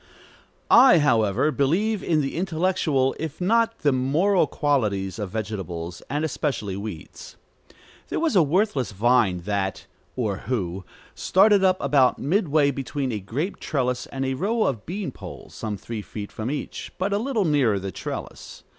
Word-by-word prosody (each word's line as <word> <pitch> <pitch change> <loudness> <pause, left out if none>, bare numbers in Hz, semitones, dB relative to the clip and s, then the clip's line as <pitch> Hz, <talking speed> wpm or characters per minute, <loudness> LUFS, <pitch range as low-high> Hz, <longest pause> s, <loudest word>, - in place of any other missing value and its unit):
I, 245 -7 +8
however, 115 -1 +2
believe 185 +10 +1
in 155 -2 +2
the 135 - -3
intellectual, 165 -6 +1
if 160 -1 -5
not 230 +4 +1
the 145 - +3
moral, 150 +10 +2
qualities 105 - 0
of 105 -3 -3
vegetables, 90 -5 -5
and 145 +4 -1
especially 135 -10 -2
weeds. 100 -6 -8 0.7
There - - -1
was 320 -8 +1
a 185 - +7
worthless 155 - +1
vine 110 -4 +2
that 95 0 -2 0.3
(or 110 -6 -1
who) 95 -6 -2 0.3
started 200 +1 +4
up 185 -1 +4
about 135 -2 +3
midway 150 -3 +2
between 135 0 -3
a 110 - -2
grape 135 - -4
trellis 125 -4 -1
and 135 0 -4
a 130 - -1
row 215 - 0
of 115 -6 -2
bean 185 -3 -4
poles, - - -11
some 105 -2 -4
three 110 +2 -6
feet 105 0 -8
from 110 +2 -4
each, 145 +1 -5
but 195 +2 -1
a 200 - +1
little 230 -4 0
nearer 140 -10 +2
the 95 0 -4
trellis. - - -7
135 Hz, 155 wpm, -24 LUFS, 110-180 Hz, 0.7 s, I